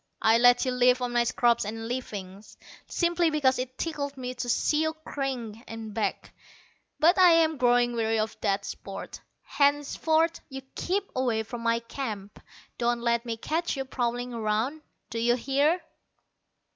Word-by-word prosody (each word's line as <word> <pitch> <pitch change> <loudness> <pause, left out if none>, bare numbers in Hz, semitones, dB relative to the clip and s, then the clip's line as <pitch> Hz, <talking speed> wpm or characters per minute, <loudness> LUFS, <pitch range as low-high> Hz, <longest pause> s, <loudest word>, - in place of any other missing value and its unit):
I 225 +1 +5
let 245 +1 +5
you 255 - 0
live 250 0 +4
on 245 -1 -2
my 240 0 +3
scraps 235 0 +2
and 225 +2 -5
leavings, 205 -5 -6 0.3
simply 345 -1 +1
because 270 -4 +2
it 255 0 -5
tickled 285 -4 -3
me 250 -1 -4
to 245 -1 -5
see 300 +5 +2
you 315 0 0
cringe 250 -6 -4
and 225 -2 -7
beg. 215 0 -2 0.7
But 345 +5 +5
I 360 -2 +8
am 320 -2 +3
growing 245 -1 +3
weary 225 -1 0
of 220 0 -1
that 200 -1 0
sport. 195 - -7 0.2
Henceforth 315 +3 +1
you 270 -1 -7
keep 385 +3 -1
away 240 -4 0
from 235 +2 -7
my 230 0 +1
camp. 220 -5 -6 0.4
Don't 240 0 +1
let 235 0 +1
me 230 -1 -3
catch 320 +6 -2
you 270 - -2
prowling 245 -1 -2
around, 225 +7 -1 0.3
d'you 235 +1 +2
hear? 280 +7 +1
245 Hz, 160 wpm, -27 LUFS, 230-285 Hz, 0.7 s, I